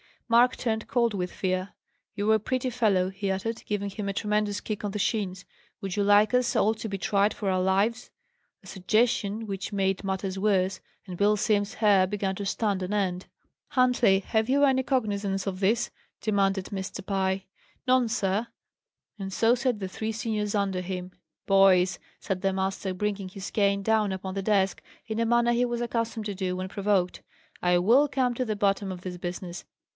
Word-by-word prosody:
Mark 240 +1 +5
turned 220 -2 -2
cold 235 -3 +1
with 180 -2 -2
fear. 185 0 -2 0.4
"You're 215 +1 +3
a - - +2
pretty 255 +4 -1
fellow!" 210 -7 +2
he 195 +1 -4
uttered, 210 +4 -2
giving 200 -1 -2
him 200 +1 -5
a - - -2
tremendous 210 0 0
kick 215 -1 -5
on 205 - -2
the 210 - -4
shins. 195 -3 -1 0.4
"Would 195 -2 -4
you 205 - +2
like 205 +2 +5
us 250 -1 +2
all 215 - +3
to 220 - -6
be 195 - -3
tried 200 +2 +1
for 200 - -2
our 185 0 +1
lives?" 200 +6 +1 0.5
A - - -14
suggestion 220 +1 0
which 195 -1 -5
made 195 0 0
matters 190 0 -2
worse; 195 -2 +1 0.3
and 180 -3 -7
Bill 205 +2 +4
Simms's 205 0 0
hair 200 -4 +4
began 195 -1 -2
to 200 - -5
stand 200 -1 0
on 185 +3 -3
end. 185 -3 -1 0.4
"Huntley, 250 -6 +4
have 220 +3 0
you 280 +2 +3
any 265 -2 +4
cognizance 205 -7 -1
of 190 -2 -3
this?" 215 +5 +1 0.3
demanded 195 -3 +1
Mr. 190 -1 -6
Pye. 190 -1 0 0.4
"None, 255 -1 +3
sir." 215 -1 0 0.7
And 195 -1 -5
so 225 +4 +4
said 250 -3 0
the 190 - -3
three 220 +3 -4
seniors 215 -1 -2
under 195 -2 0
him. 180 0 -5 0.3
"Boys!" 190 -2 +4 0.2
said 185 -2 -3
the 195 -1 +1
master, 190 0 -2
bringing 200 0 -2
his 190 +1 -7
cane 200 -1 +2
down 215 -2 +2
upon 190 0 -5
the 195 - -2
desk 195 -1 +1 0.2
in 220 -1 -3
a 230 - +2
manner 240 0 +3
he 240 +1 +2
was 240 -1 -2
accustomed 230 -2 -2
to 205 - -3
do 185 -1 -2
when 185 +1 -4
provoked: 195 -3 0 0.4
"I 180 0 +3
will 235 +11 +5
come 255 -3 0
to 255 - -1
the 215 -2 -2
bottom 200 -1 0
of 180 - -9
this 180 -1 -6
business. 175 0 -6
200 Hz, 190 wpm, -27 LUFS, 190-220 Hz, 0.7 s, Mark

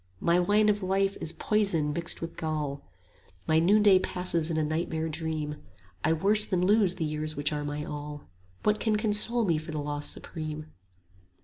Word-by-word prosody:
My 170 - +3
wine 205 +4 +3
of 210 0 +2
life 195 +1 +1
is 160 - -1
poison 175 -8 0
mixed 170 +2 -2
with 165 0 -6
gall, 150 -3 -3 0.7
35 - - -30
My 160 0 +4
noonday 200 +2 +5
passes 180 -3 -1
in 160 - -1
a 155 - +1
nightmare 160 +1 -2
dream, 155 -2 -3 0.5
I 155 - +2
worse 200 +6 +4
than 180 -3 0
lose 200 -2 +4
the 165 - -2
years 155 0 -3
which 145 +1 0
are 150 0 -3
my 145 +1 -4
all: 145 0 -7 0.4
What 210 0 +2
can 220 -2 +1
console 220 +2 +2
me 165 -5 +1
for 155 +2 -10
the 155 - -4
loss 145 0 -3
supreme? 155 -1 -6
165 Hz, 185 wpm, -28 LUFS, 155-195 Hz, 0.7 s, noonday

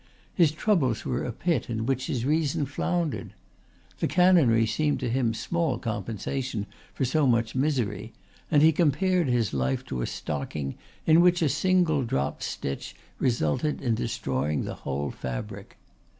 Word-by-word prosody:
His 170 -4 +4
troubles 155 - +1
were 125 - -1
a 125 - -3
pit 155 +1 -1
in 110 -1 -2
which 130 0 -1
his 120 -2 -2
reason 150 -1 +1
floundered. 165 +3 -2 0.6
The - - +1
canonry 165 -12 +4
seemed 150 +6 0
to 120 - -1
him 125 -2 +1
small 140 +4 -1
compensation 110 +2 -3 0.3
for 135 - -1
so 145 +3 +2
much 115 -2 +2
misery, 125 -6 -1 0.4
and 150 -1 +4
he 160 - +7
compared 175 +2 +2
his 120 - +1
life 65 -1 -1
to 65 - -4
a - - -1
stocking 70 -1 -4 0.3
in 160 +1 +6
which 175 -1 +4
a 155 - +3
single 175 -3 +2
dropped 70 - -2
stitch 70 - -4 0.2
resulted 120 - 0
in 120 -4 0
destroying 75 -9 -1
the - - -4
whole 70 +1 -3
fabric. 60 -2 -6
130 Hz, 150 wpm, -27 LUFS, 110-155 Hz, 0.6 s, he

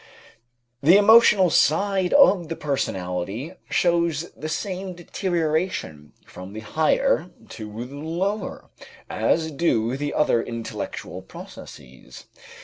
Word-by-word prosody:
The 170 +7 +6
emotional 205 -4 +6
side 190 +5 +2
of 195 - +5
the 165 - -3
personality 100 - -3 0.2
shows 170 -2 +1
the 155 - -6
same 185 +2 -4
deterioration 160 - -2
from 95 +2 -11
the 110 - -7
higher 160 - +1 0.2
to 110 +2 -7
the 135 +3 -11
lower, 175 +8 -4 0.4
as 160 -1 0
do 130 -6 0
the 145 +1 -3
other 120 -6 +2
intellectual 115 -1 -6
processes. 65 +1 -12
160 Hz, 105 wpm, -23 LUFS, 115-185 Hz, 0.4 s, The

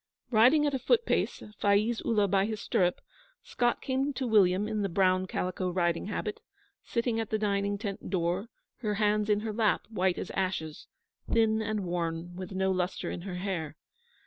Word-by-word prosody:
Riding 255 +7 +5
at 290 - +1
a 265 - 0
foot 470 - +2
pace, - - 0 0.2
Faiz 210 +3 +2
Ullah 210 -3 +2
by 195 +1 +2
his 220 -1 -3
stirrup, 180 -3 +1 0.4
Scott 245 - 0
came 270 +2 0
to 265 - -3
William 205 -3 +4
in 215 -1 -1
the 200 - 0
brown 185 +1 +2
calico 185 0 -2
riding 175 -1 0
habit, 210 0 -3 0.4
sitting 235 -1 -1
at 225 - -3
the 215 - +1
dining 200 -1 0
tent 200 -2 -5
door, 180 +3 0 0.3
her 210 -4 -2
hands 210 0 +1
in 210 0 +3
her 220 -1 -3
lap, 215 -1 +2
white 185 -4 +1
as - - -5
ashes, 180 -5 -3 0.4
thin 220 -1 +3
and 215 -1 -1
worn, 170 0 -3
with 185 +1 -7
no 190 0 +1
lustre 185 0 -2
in - - -5
her 180 0 -6
hair. 180 -5 -3
200 Hz, 180 wpm, -29 LUFS, 185-220 Hz, 0.4 s, Riding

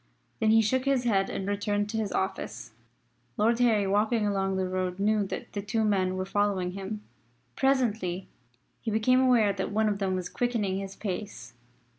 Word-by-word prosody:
Then 220 - +2
he 225 0 +6
shook 260 +5 +1
his 275 -2 +2
head 195 -5 +2
and 195 - -4
returned 205 0 0
to 225 - -2
his 215 -3 -1
office. 120 - -3 0.7
Lord 230 +2 +2
Harry 225 -5 +3
walking 210 +3 +2
along 195 -1 0
the 190 -1 0
road 185 -1 -2
knew 205 0 +1
that - - -6
the 205 - -2
two 220 +2 -1
men 185 -3 +1
were 185 - -2
following 195 -2 0
him. 195 +3 -6 0.5
Presently 220 -9 0 0.5
he 230 - -3
became 220 +4 +3
aware 235 -6 +4
that 190 0 -3
one 215 +1 +2
of 205 -1 0
them 190 -2 0
was 185 -1 -3
quickening 215 -6 -1
his 195 0 -6
pace. 185 - -5
205 Hz, 180 wpm, -28 LUFS, 190-220 Hz, 0.7 s, he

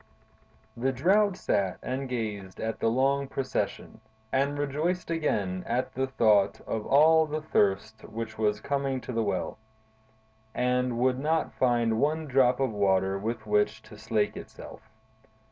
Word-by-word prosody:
The 130 +3 0
Drought 190 - +2
sat 95 - 0
and 130 +1 -3
gazed 105 -6 -4
at 110 0 -3
the - - +1
long 135 +4 +2
procession, 130 -4 -3 0.3
and 140 +2 +1
rejoiced 155 +6 -1
again 100 - -1
at 120 +2 -1
the 135 +1 -1
thought 105 -6 +3
of 110 -1 -4
all 160 +3 +5
the 155 +1 -4
thirst 105 -5 0
which 115 -1 -6
was 105 -1 0
coming 140 -2 -1
to - - -7
the 115 - +1
well, 110 0 -2 1.0
and 125 -1 +1
would 130 +1 +2
not 160 +3 0
find 120 -3 +1
one 155 +3 +1
drop 130 -2 +3
of 135 -3 +1
water 95 -1 +1
with 110 +1 -4
which 105 0 +1
to - - -13
slake 110 -1 0
itself. - - -10
125 Hz, 145 wpm, -28 LUFS, 110-140 Hz, 1.0 s, all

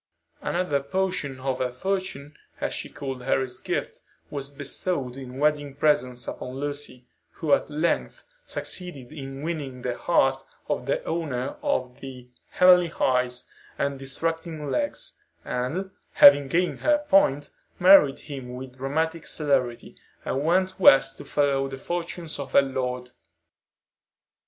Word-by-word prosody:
Another 175 -5 0
portion 140 -3 -2
of 130 -1 -2
her 130 - 0
fortune, 150 0 -3 0.2
as - - -2
she - - -4
called 135 -3 -6
Harry's 130 0 -1
gift, - - -3 0.3
was 140 -1 -4
bestowed 140 -1 -2
in 130 -1 -8
wedding 145 -1 +1
presents 130 -5 +1
upon 125 0 -6
Lucy, 145 -2 -5 0.3
who 155 -4 0
at - - +2
length 155 +3 -1 0.2
succeeded 165 - -5
in 135 -1 -7
winning 145 -6 -4
the 125 -1 -1
heart 135 -3 +2 0.2
of - - -2
the - - 0
owner 140 -6 -2
of 125 -1 -1
the 130 -2 -9 0.2
"heavenly 180 -2 +5
eyes" 125 -1 +1 0.3
and 140 -1 -1
"distracting 160 +2 -3
legs;" - - -2 0.3
and, 155 +11 -2 0.2
having 145 -1 +8
gained 175 +6 0
her 295 0 +2
point, 145 -7 +3 0.3
married 180 -7 +7
him 130 -4 -7
with 130 0 -9
dramatic 160 +5 -2
celerity, 130 -6 0 0.3
and 135 - -1
went 185 +4 +1
West 135 -6 +6
to - - -9
follow 140 -2 +1
the 135 0 -7
fortunes 170 +1 -4
of 140 -1 -6
her 140 - +7
lord. 125 -2 -3
140 Hz, 135 wpm, -25 LUFS, 130-165 Hz, 0.3 s, having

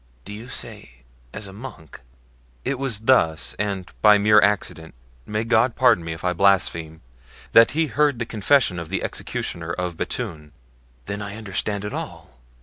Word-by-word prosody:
"Do 105 - -8
you 110 +4 -9
say - - -5 0.3
as 100 - -5
a 95 - -9
monk?" 100 - -11 0.6
"It 135 -1 -1
was 125 -6 -1
thus, 90 -9 +2
and 100 -3 -2 0.2
by 105 -1 +7
mere 105 +1 +5
accident—may 80 - -2
God 115 +1 +2
pardon 120 -8 +4
me 80 - -5
if 80 +1 -7
I 90 0 +1
blaspheme—that 80 - +1
he 165 - +3
heard 150 -2 +1
the 115 - -3
confession 110 -3 +2
of 85 -1 -7
the 95 - -2
executioner 85 -1 -4
of 90 -1 -3
Bethune." 75 -2 -4 0.5
"Then 100 +1 -4
I 100 0 -6
understand 105 -1 -3
it 105 - -5
all! 65 - -7
100 Hz, 155 wpm, -23 LUFS, 80-110 Hz, 0.6 s, by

